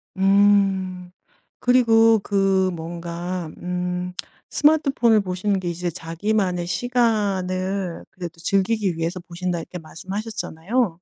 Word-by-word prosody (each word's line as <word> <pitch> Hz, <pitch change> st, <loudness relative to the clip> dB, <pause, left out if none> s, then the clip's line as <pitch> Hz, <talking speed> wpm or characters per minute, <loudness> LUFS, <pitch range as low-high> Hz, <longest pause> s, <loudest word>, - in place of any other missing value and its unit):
음. 195 Hz, -2 st, +3 dB, 0.5 s
그리고 225 Hz, -3 st, +5 dB
그 195 Hz, -2 st, +2 dB
뭔가 170 Hz, +1 st, -5 dB
음 180 Hz, 0 st, -3 dB, 0.4 s
스마트폰을 275 Hz, -8 st, +3 dB
보시는 190 Hz, +1 st, -1 dB
게 180 Hz, -, -3 dB
이제 175 Hz, +1 st, -2 dB
자기만의 175 Hz, +2 st, -1 dB
시간을 195 Hz, -6 st, 0 dB
그래도 175 Hz, -2 st, -8 dB
즐기기 195 Hz, +1 st, +1 dB
위해서 165 Hz, +2 st, -2 dB
보신다 175 Hz, 0 st, -4 dB
이렇게 180 Hz, +2 st, -8 dB
말씀하셨잖아요. 195 Hz, +4 st, -3 dB
185 Hz, 260 characters per minute, -23 LUFS, 175-210 Hz, 0.5 s, 그리고